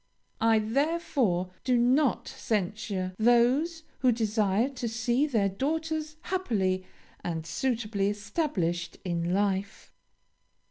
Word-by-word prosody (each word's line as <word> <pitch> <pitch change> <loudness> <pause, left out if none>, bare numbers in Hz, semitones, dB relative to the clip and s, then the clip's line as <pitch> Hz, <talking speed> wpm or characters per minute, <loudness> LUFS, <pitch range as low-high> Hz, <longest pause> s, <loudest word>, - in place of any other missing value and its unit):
I 225 0 +4
therefore 230 - 0
do 250 -1 +3
not 255 +3 +3
censure 195 -2 -2
those 250 +9 +3 0.2
who 255 -2 +4
desire 215 -1 +1
to 250 -4 -4
see 240 +5 +1
their 220 -8 +2
daughters 310 +8 -2
happily 200 - -1 0.4
and 160 -2 -3
suitably 220 -2 -1
established 205 - -2
in 170 -1 -1
life. 195 0 -1
225 Hz, 100 wpm, -28 LUFS, 195-270 Hz, 0.4 s, I